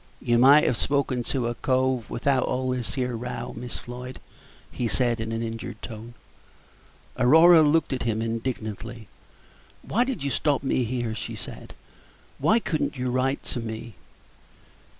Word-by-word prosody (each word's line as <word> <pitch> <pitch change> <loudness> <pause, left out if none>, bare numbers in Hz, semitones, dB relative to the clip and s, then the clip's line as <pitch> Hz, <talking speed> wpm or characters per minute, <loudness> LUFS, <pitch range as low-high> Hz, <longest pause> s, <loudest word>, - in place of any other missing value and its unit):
"You 120 0 +2
might 140 +4 +7
have 120 - +1
spoken 140 -3 +1
to 130 -3 -1
a 120 - -1
cove 130 -1 0
without 130 +1 +1
all 130 0 -1
this 125 -2 -3
here 125 -2 -1
row, 125 +2 -5
Miss 120 +1 -6
Floyd," 125 +1 -8 0.5
he 120 - -2
said, 120 0 +1
in 110 0 -3
an 115 0 -2
injured 115 0 -6
tone. 115 +1 -8 1.0
Aurora 160 +6 +7
looked 155 -1 +3
at 130 - -3
him 110 -2 0
indignantly. 115 -1 -4 0.8
"Why 235 - +1
did 250 - -3
you 140 - -1
stop 145 -1 +1
me 130 -2 +1
here?" 120 -1 -2
she 110 - -5
said; - - -9 0.6
"why 220 - +4
could 170 -9 -1
n't - - -2
you 125 0 -1
write 130 +2 0
to 125 - -4
me?" 115 0 -6
125 Hz, 160 wpm, -25 LUFS, 115-135 Hz, 1.0 s, might